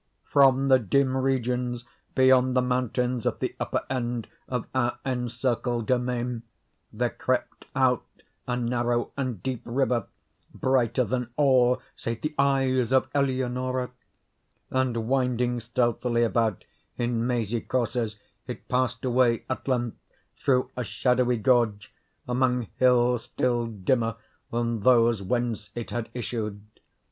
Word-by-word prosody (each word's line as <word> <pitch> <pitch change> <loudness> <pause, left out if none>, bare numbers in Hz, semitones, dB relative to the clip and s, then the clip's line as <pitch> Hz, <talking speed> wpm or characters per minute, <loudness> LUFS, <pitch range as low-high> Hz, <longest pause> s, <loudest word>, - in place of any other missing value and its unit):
From 135 -1 +4
the 130 -1 +6
dim 130 +4 +2
regions 125 -2 -1 0.3
beyond 130 -1 +5
the - - +5
mountains 125 -1 0
at - - 0
the - - -3
upper - - -1
end 120 -4 -2 0.2
of 125 -3 -2
our 120 -2 +1
encircled 125 -2 -1
domain, 125 -1 -1 0.5
there - - -1
crept - - -2
out 130 -2 +3 0.4
a 125 -1 0
narrow 120 0 0
and 130 -8 -3
deep 130 -3 -2
river, 120 -3 0 0.5
brighter 125 -2 +2
than 125 +1 -2
all 130 -3 +4
save 115 -1 -4
the 150 0 -2
eyes 135 -3 +2
of 130 0 +3
Eleonora; 130 -2 0 0.8
and, 125 -4 0
winding 125 -2 +1
stealthily 120 0 0
about 115 -3 0 0.3
in 120 -1 0
mazy 120 -2 -1
courses, 120 -3 -1 0.3
it - - -7
passed 125 -1 0
away, 125 -2 +2
at 130 - -4
length, 120 -3 0 0.4
through 130 -2 +1
a 125 - -2
shadowy 125 +1 +1
gorge, 110 -2 +1 0.3
among 125 -2 +1
hills 125 -1 +3
still 120 -2 0
dimmer 115 +2 0 0.4
than 115 -1 -1
those 115 -1 +4
whence 115 +1 -2
it 120 -1 -5
had 120 -2 -3
issued. 110 -3 -3
125 Hz, 125 wpm, -26 LUFS, 120-130 Hz, 0.8 s, the